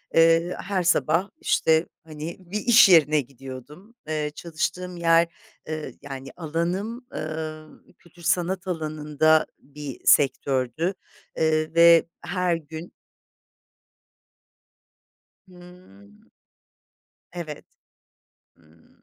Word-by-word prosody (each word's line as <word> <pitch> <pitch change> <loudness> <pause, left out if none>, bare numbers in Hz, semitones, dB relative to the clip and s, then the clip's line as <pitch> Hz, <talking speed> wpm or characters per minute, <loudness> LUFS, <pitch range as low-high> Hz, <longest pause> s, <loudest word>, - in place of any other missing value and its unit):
eee, 165 +2 +4
her 190 -2 -1
sabah, 175 +2 +2
işte, 160 - +2 0.2
hani, 155 +1 -7
bir 185 +3 -5
iş 225 -2 +6
yerine 155 -3 +5
gidiyordum. 135 - -12
Eee, 155 -1 -2
çalıştığım 175 +2 -4
yer, 165 0 +4 0.4
ııı, 155 -1 -4
yani 135 -1 -8
alanım, 180 - -3
ııı, 155 0 -6
kültür 170 0 -20
sanat 180 +3 0
alanında 155 -2 +1
bir 145 -2 -9
sektördü, 135 +4 +2 0.4
ııı, 155 0 +1
ve 170 0 +7 0.2
her 180 -1 0
gün 160 +1 -9 2.6
Hımm. 175 - -17 1.1
Evet. 160 -4 -7 0.9
Hımm. 80 0 -26
160 Hz, 90 wpm, -24 LUFS, 150-175 Hz, 2.6 s, ve